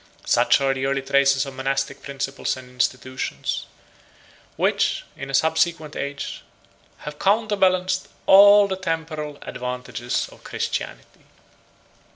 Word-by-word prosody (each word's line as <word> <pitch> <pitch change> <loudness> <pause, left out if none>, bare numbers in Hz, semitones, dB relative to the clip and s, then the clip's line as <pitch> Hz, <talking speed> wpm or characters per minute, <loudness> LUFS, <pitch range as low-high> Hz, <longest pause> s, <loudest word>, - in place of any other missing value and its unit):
98 - - -21
Such - - +4
are 135 -1 +2
the 135 0 -2
early 135 0 -1
traces 140 0 +3
of 135 - -8
monastic 135 +1 -2
principles 135 -1 -3
and 130 -1 -11
institutions, 130 0 -2 0.9
which, - - +1
in 135 +1 -7
a - - -6
subsequent 160 0 +1
age, 140 0 -5 0.6
have 150 0 -7
counterbalanced 190 -3 +2 0.2
all 200 +1 +8
the 190 -1 -3
temporal 160 -5 -4
advantages 125 -1 -4
of - - -17
Christianity. - - -5
140 Hz, 120 wpm, -23 LUFS, 135-180 Hz, 0.9 s, all